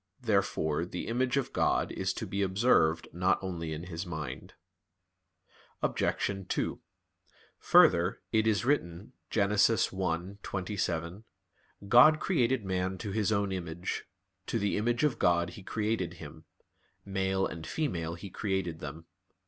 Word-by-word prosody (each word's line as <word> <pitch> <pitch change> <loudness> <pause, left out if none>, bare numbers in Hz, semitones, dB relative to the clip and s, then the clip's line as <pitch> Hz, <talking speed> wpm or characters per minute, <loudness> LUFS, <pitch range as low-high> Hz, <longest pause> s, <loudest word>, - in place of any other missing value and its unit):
Therefore 95 -8 +1
the 90 0 -5
image 125 +3 0
of 135 - -1
God - - +1
is - - -1
to - - -5
be 100 - -3
observed 95 -5 +3
not 90 +2 +2
only 85 -4 -4
in 80 +1 -5
his 85 -1 -5
mind. 75 -7 -6 1.3
Obj. 100 -2 -1
2: - - -1 0.8
Further, 90 +2 +5
it 110 -1 +2
is 110 +1 +2
written 105 - -1 0.2
(Gen. 100 -2 +1
1:27): 95 -2 0 0.6
"God 125 +8 +7
created 130 - +1
man 95 0 -1
to 100 - -5
His 110 0 0
own 100 -2 +1
image; 85 -1 -4 0.4
to - - 0
the 100 -2 0
image 120 +5 0
of 150 -5 +1
God 85 0 +2
He 85 - -10
created 105 -4 -2
him; 80 +1 -11 0.6
male 95 -1 0
and 80 0 -6
female 85 - -2
He 90 +3 -9
created 95 -6 -2
them." 80 +2 -8
95 Hz, 130 wpm, -30 LUFS, 85-110 Hz, 1.3 s, God